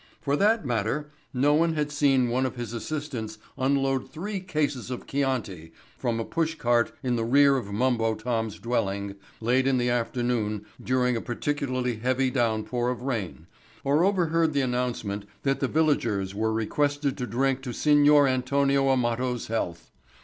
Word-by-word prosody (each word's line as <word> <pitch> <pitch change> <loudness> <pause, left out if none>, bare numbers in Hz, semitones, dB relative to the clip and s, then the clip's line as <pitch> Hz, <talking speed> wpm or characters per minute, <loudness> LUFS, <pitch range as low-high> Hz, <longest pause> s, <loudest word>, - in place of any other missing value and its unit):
For 140 0 0
that 210 +1 +2
matter 125 +5 -1 0.2
no 140 +3 +3
one 165 +1 +2
had 150 -1 -1
seen 135 -4 +3
one 130 +2 +1
of 130 - -7
his 120 -2 -5
assistants 120 -4 -4 0.2
unload 135 0 0
three 195 +5 -4
cases 150 -8 -2
of 125 - -5
Chianti 115 - -2 0.2
from 120 -3 -2
a 115 - -2
push 165 -1 -1
cart 120 -4 +2
in 125 -2 0
the 115 - 0
rear 140 +4 +5
of 115 -6 -3
Mumbo 115 0 +1
Tom's 110 -3 -2
dwelling 100 -4 -2 0.3
late 125 +4 +2
in 135 -1 +3
the 120 0 +1
afternoon 120 -3 -1 0.2
during 125 -1 +1
a 115 - -2
particularly 130 -2 -2
heavy 130 +3 +1
downpour 120 0 0
of 125 -1 -4
rain 110 -11 -3 0.4
or 140 +1 +2
had 185 - +5
overheard 165 -4 +1
the 140 - +2
announcement 125 -5 -2 0.2
that 135 -1 +1
the 135 - +1
villagers 115 -11 +1
were 110 +2 0
requested 145 +5 0
to 125 - -2
drink 135 +2 0
to 130 -2 -5
Signor 145 +2 +5
Antonio 135 +1 +2
Amato's 125 -1 0
health. 85 -7 -3
125 Hz, 165 wpm, -26 LUFS, 115-140 Hz, 0.4 s, rear